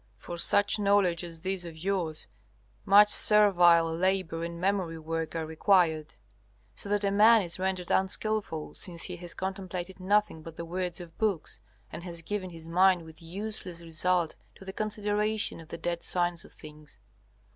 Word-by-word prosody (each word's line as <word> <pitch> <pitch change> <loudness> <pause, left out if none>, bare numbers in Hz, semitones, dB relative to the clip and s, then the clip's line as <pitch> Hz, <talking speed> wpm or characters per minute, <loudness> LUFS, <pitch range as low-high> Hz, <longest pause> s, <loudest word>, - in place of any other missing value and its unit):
For 175 - -8
such 205 +4 +3
knowledge 200 -4 +2
as 165 -2 -7
this 190 0 -2
of 165 -2 -9
yours 170 -3 -2 0.6
much 205 +1 +7
servile 180 -6 +6
labor 185 -2 -1
and 170 0 -5
memory 185 -3 -1
work 160 +1 -4
are 165 -1 -2
required, 160 -1 +1 0.6
so 200 - -3
that 205 0 +1
a 200 - +1
man 215 +2 +6
is 170 0 -3
rendered 185 -1 -2
unskilful, 190 -4 -1
since 170 -3 -4
he 180 -2 -4
has 175 0 -6
contemplated 190 -1 -5
nothing 200 -3 +1
but 165 0 -10
the 170 - -6
words 180 +1 -3
of 170 -2 -12
books 205 -7 -1 0.3
and - - -7
has 170 -1 -6
given 190 +1 -4
his 165 -2 -9
mind 180 +1 +3
with 160 0 -14
useless 185 0 -6
result 170 +1 0 0.2
to 195 - -14
the 190 - -7
consideration 210 -1 -1
of 165 - -12
the 170 - -7
dead 170 0 -3
signs 175 -1 +1
of - - -16
things. 150 -1 -11
180 Hz, 170 wpm, -28 LUFS, 165-195 Hz, 0.6 s, much